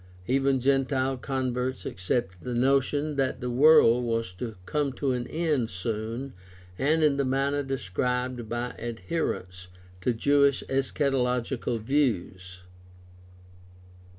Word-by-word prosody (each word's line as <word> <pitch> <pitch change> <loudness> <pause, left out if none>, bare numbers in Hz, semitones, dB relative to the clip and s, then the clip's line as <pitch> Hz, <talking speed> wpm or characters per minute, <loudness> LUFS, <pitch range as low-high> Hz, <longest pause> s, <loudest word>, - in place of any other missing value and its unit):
Even 135 +2 +2
gentile 135 0 +1
converts 130 -1 -2
accepted 95 0 -2
the 125 -1 -4
notion 140 +3 +1
that 130 -2 0
the 125 -1 -3
world 125 -3 +6
was 115 -4 -1
to 110 +4 -6
come 145 +2 0
to 135 0 -1
an 125 -1 -2
end 155 -8 0
soon 115 +7 -4 0.5
and 155 +4 +2
in 145 -2 +3
the 140 - +2
manner 135 +2 0
described 125 -1 -2
by 120 +1 -2
adherents 115 - -4 0.3
to 125 - +1
Jewish 140 +3 +3
eschatological 130 -3 0
views. 95 -8 -1
130 Hz, 115 wpm, -27 LUFS, 115-140 Hz, 0.5 s, world